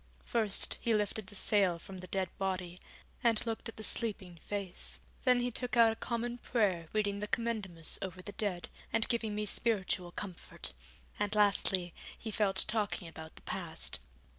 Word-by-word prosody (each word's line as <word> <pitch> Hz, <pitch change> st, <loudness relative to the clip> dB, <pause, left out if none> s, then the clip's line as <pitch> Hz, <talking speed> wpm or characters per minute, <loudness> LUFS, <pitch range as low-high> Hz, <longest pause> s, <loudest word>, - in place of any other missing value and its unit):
First, 220 Hz, -4 st, +3 dB
he 230 Hz, -2 st, +2 dB
lifted 210 Hz, -1 st, -1 dB
the 205 Hz, -, -10 dB
sail 190 Hz, -3 st, +4 dB
from 185 Hz, +2 st, -9 dB
the 185 Hz, -, -8 dB
dead 185 Hz, -1 st, -1 dB
body, 185 Hz, -2 st, -2 dB, 0.4 s
and 230 Hz, -2 st, +3 dB
looked 225 Hz, 0 st, -3 dB
at -, -, -9 dB
the 220 Hz, -, -6 dB
sleeping 200 Hz, -6 st, 0 dB
face. 200 Hz, -3 st, -3 dB, 0.3 s
Then 250 Hz, -1 st, +5 dB
he 245 Hz, 0 st, 0 dB
took 245 Hz, +1 st, -1 dB
out 230 Hz, -1 st, +8 dB
a -, -, -9 dB
Common 240 Hz, +1 st, -2 dB
Prayer 195 Hz, -10 st, +1 dB
reading 205 Hz, -2 st, 0 dB
the 210 Hz, -, -3 dB
Commendamus 210 Hz, -9 st, 0 dB
over 185 Hz, -1 st, -5 dB
the 205 Hz, -, -6 dB
dead, 195 Hz, -5 st, -2 dB, 0.2 s
and 225 Hz, -, +2 dB
giving 225 Hz, -3 st, 0 dB
me 210 Hz, 0 st, -1 dB
spiritual 195 Hz, -5 st, +1 dB
comfort, 180 Hz, -, -6 dB, 0.5 s
and 205 Hz, 0 st, 0 dB
lastly, 195 Hz, -4 st, +3 dB, 0.2 s
he 220 Hz, -, -5 dB
fell 205 Hz, -2 st, +2 dB
to -, -, +4 dB
talking 210 Hz, -5 st, -1 dB
about 160 Hz, -1 st, -10 dB
the -, -, -11 dB
past. -, -, 0 dB
205 Hz, 175 wpm, -33 LUFS, 185-225 Hz, 0.5 s, out